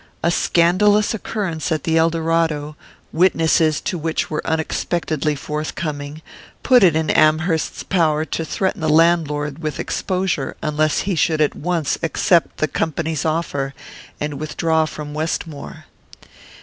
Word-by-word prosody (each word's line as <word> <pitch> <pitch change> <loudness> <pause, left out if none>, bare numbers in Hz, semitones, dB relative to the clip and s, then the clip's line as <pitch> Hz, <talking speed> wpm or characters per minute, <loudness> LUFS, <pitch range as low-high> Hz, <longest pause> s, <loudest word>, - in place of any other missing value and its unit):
A 170 - +3
scandalous 205 +7 +3
occurrence 190 -6 -3
at 155 -3 -1
the 160 - 0
Eldorado, 165 -2 +1 0.4
witnesses 160 -3 +3
to 185 -5 -3
which 160 0 -2
were 150 - -1
unexpectedly 160 -1 -1
forthcoming, 150 0 -5 0.4
put 255 -1 +5
it 175 -5 +5
in 160 0 +1
Amherst's 155 +1 +2
power 160 -4 +1
to 165 - -3
threaten 190 +3 -2
the 155 - 0
landlord 150 -2 +2
with 155 -2 -4
exposure 185 -7 -2
unless 155 0 +1
he 195 - -1
should 160 -1 +1
at 150 -2 +2
once 170 -3 -1
accept 165 +1 +2
the 155 - +1
company's 160 -1 -2
offer 145 -4 -2 0.4
and 150 -2 -3
withdraw 160 +1 0
from 150 -1 -7
Westmore. 155 -1 -4
160 Hz, 130 wpm, -20 LUFS, 150-170 Hz, 0.4 s, put